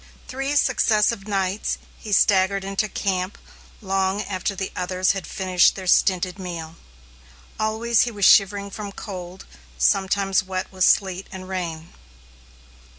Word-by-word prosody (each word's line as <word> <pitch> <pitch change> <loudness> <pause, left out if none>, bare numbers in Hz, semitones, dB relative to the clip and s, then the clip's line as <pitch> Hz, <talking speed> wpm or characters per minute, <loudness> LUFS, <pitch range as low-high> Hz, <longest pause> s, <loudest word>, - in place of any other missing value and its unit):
Three 270 +2 -3
successive 220 -6 +2
nights, 195 0 -1 0.2
he 215 - -8
staggered 195 -1 +3
into 195 +2 -2
camp 190 -1 -2 0.4
long 195 0 0
after 195 +1 -3
the 190 0 -4
others 185 +1 0
had 195 -2 -5
finished 185 -2 +2
their 190 - -7
stinted 185 0 +2
meal. 170 -3 -6 0.8
Always 220 +1 +1
he 245 - +1
was 205 -4 -1
shivering 200 0 +4
from 200 0 -7
cold, 185 -3 -8 0.3
sometimes 195 - +2
wet 185 -1 -5
with 185 -1 +2
sleet 190 -1 +2
and 185 -1 -8
rain. 170 -4 -5
195 Hz, 130 wpm, -23 LUFS, 185-205 Hz, 0.8 s, shivering